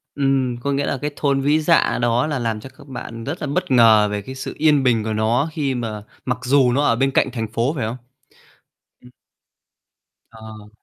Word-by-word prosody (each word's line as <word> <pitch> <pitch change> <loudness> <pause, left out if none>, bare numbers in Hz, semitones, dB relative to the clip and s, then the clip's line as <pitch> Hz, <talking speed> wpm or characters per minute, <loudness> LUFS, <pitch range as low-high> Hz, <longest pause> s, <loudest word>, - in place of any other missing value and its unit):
Ừm, 135 -3 0
có 140 +3 -2
nghĩa 140 +1 0
là 135 - -2
cái 150 - -1
thôn 140 -2 +1
Vĩ 145 +3 +2
Dạ 165 +2 +2
đó 120 +2 +1
là 150 -3 -2
làm 115 -3 -2
cho 130 - -11
các - - -15
bạn 115 -3 -7
rất 145 +7 -5
là 155 - -3
bất 140 - -2
ngờ 110 -4 +5
về 105 0 -3
cái 130 - -8
sự 130 - -6
yên 150 -2 +3
bình 115 -4 +2
của 110 - -2
nó 115 +7 +1
khi 140 -4 -1
mà 110 -4 -4 0.2
mặc 125 -1 -2
dù 130 -1 +3
nó 140 +4 +1
ở 115 - +3
bên 135 +3 +1
cạnh 130 - +1
thành 115 -3 -3
phố 120 +4 0
phải 130 -7 -2
hông? 115 +3 -4 1.1
Ừm. 125 - -16 1.2
Ờ. 110 -2 -12
125 Hz, 215 wpm, -20 LUFS, 115-140 Hz, 1.2 s, ngờ